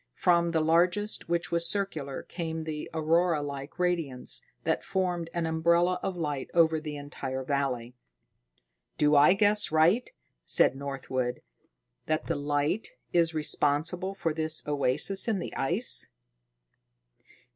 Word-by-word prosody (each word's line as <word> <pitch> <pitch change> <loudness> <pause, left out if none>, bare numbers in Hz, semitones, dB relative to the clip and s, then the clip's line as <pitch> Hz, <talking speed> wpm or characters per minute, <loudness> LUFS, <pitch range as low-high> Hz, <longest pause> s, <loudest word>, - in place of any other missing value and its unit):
From 170 -1 +3
the 165 -1 +1
largest, 175 +6 +1
which 170 0 -1
was 170 0 +2
circular, 160 -9 -2
came 160 -2 -4
the 155 -1 -5
auroralike 155 -3 0
radiance 170 -8 -1 0.2
that - - 0
formed 180 -3 -1
an 170 -1 -2
umbrella 170 +3 +2
of 190 -2 -3
light 150 -5 -3
over 160 -2 +4
the 150 -2 -5
entire 135 -2 -5
valley. 130 -3 -2 1.0
"Do 150 0 +4
I 145 +5 +7
guess 205 -1 +2
right," 170 +10 +3 0.3
said 125 - +4
Northwood, 135 -3 -3 0.6
"that 155 0 0
the - - -1
light 145 - -1 0.2
is 165 -2 +2
responsible 155 +5 +1
for 165 -4 -1
this 160 0 -2
oasis 150 - 0
in 220 -3 +1
the - - -5
ice?" 180 - 0
160 Hz, 125 wpm, -28 LUFS, 145-175 Hz, 1.0 s, I